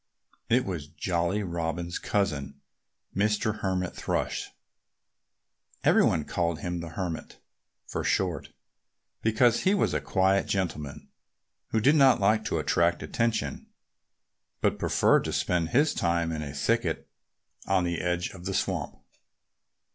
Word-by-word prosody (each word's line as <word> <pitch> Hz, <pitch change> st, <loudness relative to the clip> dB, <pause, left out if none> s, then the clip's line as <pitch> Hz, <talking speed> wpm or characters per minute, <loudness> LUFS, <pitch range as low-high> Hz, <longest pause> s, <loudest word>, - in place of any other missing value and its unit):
It 125 Hz, +2 st, +3 dB
was 85 Hz, -7 st, -4 dB
Jolly 85 Hz, +5 st, -1 dB
Robin's 85 Hz, -1 st, -3 dB
cousin, 75 Hz, -9 st, -1 dB, 0.6 s
Mr. 105 Hz, +1 st, +1 dB
Hermit 95 Hz, -2 st, -1 dB
Thrush. -, -, -2 dB, 1.3 s
Everybody 80 Hz, -, +4 dB
called 85 Hz, +1 st, -1 dB
him 90 Hz, 0 st, -3 dB
"the 85 Hz, 0 st, -6 dB
Hermit" 90 Hz, -4 st, -4 dB, 0.5 s
for -, -, -4 dB
short, 90 Hz, -6 st, 0 dB, 0.7 s
because 115 Hz, +2 st, +3 dB
he 195 Hz, +2 st, +3 dB
was 200 Hz, -, +1 dB
a -, -, 0 dB
quiet 95 Hz, 0 st, +2 dB
gentleman, 80 Hz, -7 st, -3 dB, 0.6 s
who 110 Hz, -, 0 dB
did 135 Hz, +7 st, +5 dB
not 135 Hz, -4 st, +6 dB
like 105 Hz, +2 st, +3 dB
to -, -, 0 dB
attract 85 Hz, 0 st, +1 dB
attention, 110 Hz, -, -1 dB, 0.9 s
but -, -, +1 dB
preferred -, -, +3 dB
to -, -, -2 dB
spend 85 Hz, -2 st, 0 dB
his 145 Hz, +4 st, +3 dB
time 85 Hz, -1 st, 0 dB
in 80 Hz, -1 st, -3 dB
a 75 Hz, -2 st, -5 dB
thicket 70 Hz, -, 0 dB, 0.6 s
on 95 Hz, -2 st, +3 dB
the 85 Hz, -1 st, -1 dB
edge 90 Hz, 0 st, -1 dB
of 90 Hz, -2 st, -11 dB
the 95 Hz, -1 st, -2 dB
swamp. 90 Hz, -8 st, -2 dB
90 Hz, 130 wpm, -28 LUFS, 85-105 Hz, 1.3 s, not